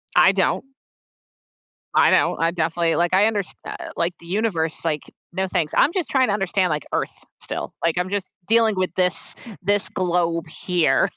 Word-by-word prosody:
I - - +7
don't. - - +1 1.3
I - - +6
don't, - - +3
I 165 0 +2
definitely, 170 0 0
like, 175 +1 +1
I 200 +4 +5
understa 205 -4 -2 0.4
like, 170 +1 0
the 170 - -14
universe, 175 -5 -1
like 155 -3 0 0.3
no, 190 +2 -1
thanks, 175 -5 -1
I'm 305 - +4
just 365 -5 -1
trying 260 -3 +3
to - - +2
understand, 195 -2 +1
like, 150 -1 -2
Earth - - -1 0.3
still, - - -4
like, 165 -1 +1
I'm 180 +1 -1
just 200 -1 -2 0.2
dealing 225 -1 +4
with 185 -1 -1
this 180 -2 0 0.3
this 200 0 +1
globe 175 -4 0
here. 160 -3 +1
180 Hz, 170 wpm, -22 LUFS, 170-200 Hz, 1.3 s, I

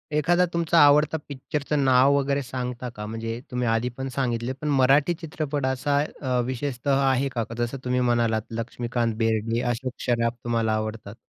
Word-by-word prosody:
एखादा 175 +4 +3
तुमचा 170 0 +2
आवडता 150 +2 +4
पिक्चरचं 145 +1 -2
नाव 130 +2 +5
वगैरे 140 0 0
सांगता 125 -1 -5
का? 105 0 -6
म्हणजे 115 +1 -4
तुम्ही 125 -1 -1
आधी 115 +2 +1
पण 135 0 -3
सांगितले 120 -2 -1
पण 150 - -3
मराठी 140 +4 +4
चित्रपट 150 -3 -3
असा 130 +2 0 0.2
अ, 130 -3 0
विशेषतः 135 +1 -1
आहे 135 +1 +1
का? 115 - 0
जसं 120 +3 -2
तुम्ही 125 0 +1
म्हणालात, 120 -2 +2
लक्ष्मीकांत 120 0 -2
बेर्डे, 115 +1 0
अशोक 125 +1 -4
सराफ 115 -1 +1
तुम्हाला 115 -2 0
आवडतात. 110 -1 -4
125 Hz, 160 wpm, -25 LUFS, 115-140 Hz, 0.2 s, नाव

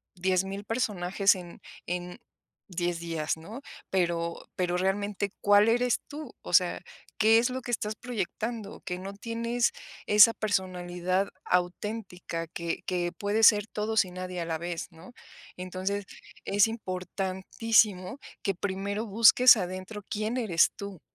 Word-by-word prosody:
10,000 190 +2 -1
personajes 200 -4 +1
en 175 -2 -10 0.2
en 180 0 -4 0.5
10 175 -2 -2
días, 165 -2 -2
¿no? 215 +12 -9 0.3
Pero 170 -2 -1
pero 180 -1 0
realmente 200 +2 -1
¿cuál 205 +1 +5
eres 245 +1 +2
tú? 300 +1 -8
O - - -8
sea, - - +4 0.4
¿qué 220 +1 +6
es 240 +2 +3
lo 260 +1 -4
que 240 - -9
estás 215 -2 -2
proyectando? 225 -1 -4
Que 180 0 -3
no 195 +2 -7
tienes 230 +3 -1 0.3
esa 210 +2 +7
personalidad 185 -2 -1 0.2
auténtica 180 -2 -2
que 170 0 -4
que 175 -1 -1
puede 205 +5 -1
ser 210 -1 +6
todos 215 -1 +1
y 180 - -10
nadie 185 0 -5
a 170 - -2
la 165 -1 -2
vez, 170 0 -4
¿no? 165 +5 -14 0.5
Entonces, 190 +2 -3 0.4
es 200 0 +4
importantísimo 190 +2 0 0.2
que 195 -2 -1
primero 200 +3 -3
busques 230 +3 +7
adentro. 185 +3 -5
¿Quién 215 +4 -2
eres 185 -9 +3
tú? 200 -4 -7
195 Hz, 135 wpm, -28 LUFS, 180-215 Hz, 0.5 s, esa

